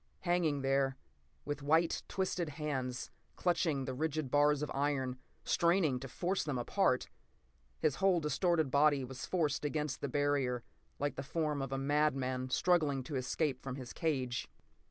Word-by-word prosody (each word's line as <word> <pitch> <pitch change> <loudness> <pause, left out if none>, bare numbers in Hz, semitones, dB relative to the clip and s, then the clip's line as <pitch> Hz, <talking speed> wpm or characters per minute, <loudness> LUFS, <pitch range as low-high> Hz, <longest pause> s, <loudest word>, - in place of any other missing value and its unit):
Hanging 175 -5 +1
there, 135 0 +2 0.5
with 145 0 -3
white, 160 +4 +2
twisted 180 -3 -1
hands 135 -4 -3 0.2
clutching 165 -6 +1
the 130 - -3
rigid 155 -1 -2
bars 145 0 +4
of 150 - -3
iron, 135 -2 -1 0.2
straining 170 -6 +2
to 135 - -6
force 180 +9 -1
them 145 -4 -2
apart. 120 - +1 0.7
His 150 -3 +1
whole 190 -3 +4
distorted 160 0 +1
body 145 -1 +4
was 130 +1 -6
forced 155 -6 0
against 150 -1 -2
the 140 - -2
barrier, 140 -3 +1 0.3
like 145 0 -2
the - - -2
form 150 0 -1
of 135 0 -4
a 135 - -1
madman 135 -2 +1
struggling 150 -3 +2
to 140 +3 -5
escape 130 +1 -1
from 135 -1 -5
his 130 -3 -7
cage. 130 -6 -1
145 Hz, 155 wpm, -34 LUFS, 135-155 Hz, 0.7 s, bars